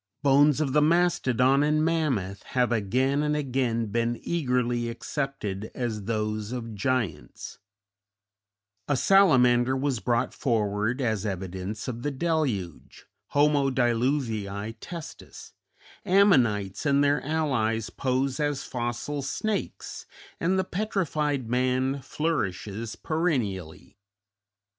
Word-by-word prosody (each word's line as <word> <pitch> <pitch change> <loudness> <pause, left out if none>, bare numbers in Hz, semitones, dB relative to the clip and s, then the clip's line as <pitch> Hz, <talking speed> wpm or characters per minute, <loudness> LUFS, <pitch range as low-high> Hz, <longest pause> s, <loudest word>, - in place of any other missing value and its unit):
Bones 145 +1 +5
of 140 -4 0
the 150 - +4
Mastodon 145 -6 +3
and 155 +1 +2
Mammoth 130 - 0 0.2
have 125 -1 +3
again 130 +6 +1
and 150 0 0
again 125 -5 0
been 115 +3 -1
eagerly 125 -7 0
accepted 115 -5 -4
as 110 -5 -3
those 110 -1 -2
of 115 -3 -5
giants; 105 - -3 1.3
a 145 - +1
salamander 130 -9 +4
was 135 -3 -1
brought 115 +4 0
forward 110 0 0
as 110 -6 0
evidence 95 +2 -4
of 120 -2 -4
the 145 - -1
deluge 135 - -2 0.2
(homo 145 -1 +3
diluvii 115 -5 0
testis); 165 +2 -9 0.5
ammonites 130 - +3
and 140 -1 +3
their 145 0 +2
allies 130 -8 0
pose 130 +1 -1
as 145 -2 -1
fossil 120 +4 -3
snakes, 200 +10 -4 0.3
and 185 +3 +1
the 190 - +2
"petrified 155 - -1
man" 130 +3 0
flourishes 110 - -3
perennially. 105 - -2
130 Hz, 105 wpm, -26 LUFS, 110-145 Hz, 1.3 s, Bones